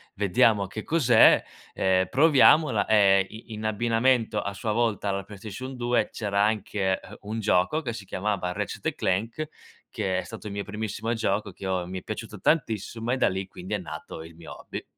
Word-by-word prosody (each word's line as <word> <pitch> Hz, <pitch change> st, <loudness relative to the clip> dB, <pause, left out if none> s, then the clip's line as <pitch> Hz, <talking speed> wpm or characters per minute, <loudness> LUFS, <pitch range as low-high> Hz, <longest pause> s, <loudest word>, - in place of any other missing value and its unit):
vediamo 100 Hz, +1 st, +3 dB
che 110 Hz, +3 st, -7 dB
cos'è, 130 Hz, -9 st, +5 dB, 0.3 s
ehm, 95 Hz, 0 st, +2 dB
proviamola"; 140 Hz, -4 st, +5 dB
ehm, 100 Hz, -3 st, +5 dB
i 110 Hz, +1 st, -11 dB
in 110 Hz, -, -6 dB
abbinamento 115 Hz, +2 st, +1 dB
a 100 Hz, -, -4 dB
sua 105 Hz, +2 st, -2 dB
volta 115 Hz, -3 st, 0 dB
alla 100 Hz, 0 st, -2 dB
PlayStation 110 Hz, +6 st, -8 dB
2 120 Hz, 0 st, +1 dB
c'era 100 Hz, -2 st, 0 dB
anche, 105 Hz, -3 st, 0 dB
ehm, -, -, -13 dB
un 110 Hz, +2 st, -4 dB
gioco 105 Hz, -, +2 dB
che 120 Hz, -5 st, -4 dB
si 110 Hz, -3 st, -8 dB
chiamava 95 Hz, -1 st, -2 dB
Ratchet& 100 Hz, +2 st, -3 dB
Clank, 115 Hz, +11 st, -1 dB, 0.4 s
che 95 Hz, -1 st, -2 dB
è -, -, -4 dB
stato 110 Hz, -1 st, -9 dB
il 100 Hz, -, -6 dB
mio 100 Hz, -, -3 dB
primissimo 110 Hz, +2 st, -3 dB
gioco, 110 Hz, -2 st, -1 dB
che 95 Hz, -, -9 dB
ho 95 Hz, -2 st, -1 dB
mi 95 Hz, 0 st, -5 dB
è -, -, -19 dB
piaciuto -, -, -7 dB
tantissimo 115 Hz, -, 0 dB
e 130 Hz, -, +1 dB
da -, -, +3 dB
lì, 95 Hz, 0 st, -4 dB
quindi, 95 Hz, +2 st, -8 dB
è -, -, +2 dB
nato 80 Hz, -4 st, -8 dB
il 80 Hz, 0 st, -13 dB
mio 85 Hz, -, -10 dB
hobby. -, -, -7 dB
105 Hz, 190 wpm, -26 LUFS, 95-115 Hz, 0.4 s, cos'è